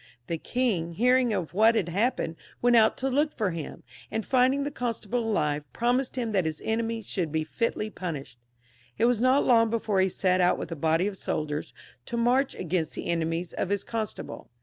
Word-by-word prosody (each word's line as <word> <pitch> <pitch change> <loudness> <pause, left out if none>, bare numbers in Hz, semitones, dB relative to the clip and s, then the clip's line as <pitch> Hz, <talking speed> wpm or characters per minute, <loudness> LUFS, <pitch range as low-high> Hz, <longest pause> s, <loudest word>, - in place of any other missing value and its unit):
The 165 +3 -3
king, 195 -10 -1
hearing 250 +4 +3
of 185 -6 -2
what 220 +4 +5
had 195 -6 +1
happened, 200 -3 0 0.2
went 245 0 +4
out 220 -1 +5
to 265 - -1
look 290 +3 +1
for 210 -5 0
him; 165 -3 -7 0.3
and 220 -1 -3
finding 260 +2 +3
the 290 - -3
constable 240 -3 -2
alive, 150 -10 0
promised 245 +3 0
hiTn 235 -4 -2
that 190 -4 +2
his 155 -1 -2
enemy 225 0 -1
should 175 -5 -3
be 160 0 0
fitly 215 +5 -2
punished. 145 - -6 0.6
It 230 - +3
was 240 -2 +2
not 255 +3 +4
long 230 -2 +5
before 215 -4 +1
he 190 - +3
set 185 0 +1
out 180 0 +3
vidth - - -6
a - - -2
body 160 +4 +1
of 200 -2 -3
soldiers 150 -1 -3 0.4
to 235 - -3
march 250 +4 +2
against 170 -2 -2
the - - -5
enemies 165 +1 -1
of - - -2
his 200 -1 0
constable. 225 -2 -5
215 Hz, 195 wpm, -27 LUFS, 170-240 Hz, 0.6 s, what